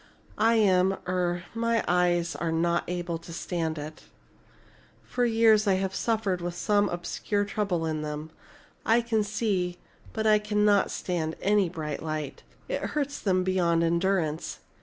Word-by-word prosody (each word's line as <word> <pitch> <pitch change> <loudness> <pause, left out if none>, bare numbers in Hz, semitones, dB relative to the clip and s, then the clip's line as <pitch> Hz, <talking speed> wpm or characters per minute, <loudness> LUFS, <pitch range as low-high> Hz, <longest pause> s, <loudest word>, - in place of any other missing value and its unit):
"I 225 +2 +4
am 190 -3 +3
er 175 -1 0
my 230 0 +1
eyes 175 -1 +2
are 165 -1 -2
not 170 +1 +1
able 175 -1 -3
to 165 - -12
stand 165 -1 -3
it. 155 +1 -8 1.0
For 245 0 -1
years 225 -2 +4
I 195 - +4
have 190 0 -1
suffered 205 -4 0
with 175 0 -4
some 205 +2 +2
obscure 205 +4 -2
trouble 200 -5 -1
in 155 -1 -2
them. 150 +1 -5 0.5
I 230 +2 +4
can 225 -2 0
see, 200 -4 -1 0.3
but 220 0 -3
I 215 -1 +5
cannot 210 -1 +2
stand 165 -3 -2
any 200 -2 +2
bright 155 -4 -5
light. 155 -3 -4 0.3
It - - -2
hurts 285 -1 -2
them 185 -2 +1
beyond 175 -3 +2
endurance. 170 -2 0
185 Hz, 150 wpm, -27 LUFS, 170-210 Hz, 1.0 s, I